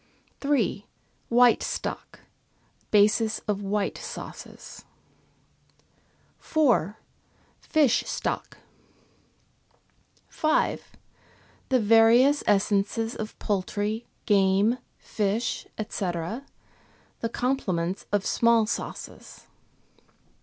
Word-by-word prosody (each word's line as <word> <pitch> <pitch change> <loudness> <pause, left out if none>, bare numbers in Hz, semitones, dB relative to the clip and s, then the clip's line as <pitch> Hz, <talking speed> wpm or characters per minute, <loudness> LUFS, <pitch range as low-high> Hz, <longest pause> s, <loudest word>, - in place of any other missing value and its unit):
3. 245 -8 0 0.4
White 245 0 +5
stock, - - -5 0.7
basis 215 +1 +3
of 205 -1 -1
white 200 0 -2
sauces. - - -9 1.6
4. 240 - +1 0.6
Fish 295 -7 +2
stock. - - -3 1.7
5. 310 0 0 0.8
The 260 -2 +3
various 230 +6 +5
essences 210 +3 +1
of 215 0 -6
poultry, 205 +3 -2 0.2
game, 200 +3 +3 0.2
fish, 215 +2 -2
&c., 210 -2 -3
the 220 +5 -8
complements 190 -10 -1
of 205 -1 +1
small 230 -1 +3
sauces. 215 - -7
220 Hz, 70 wpm, -26 LUFS, 200-240 Hz, 1.7 s, White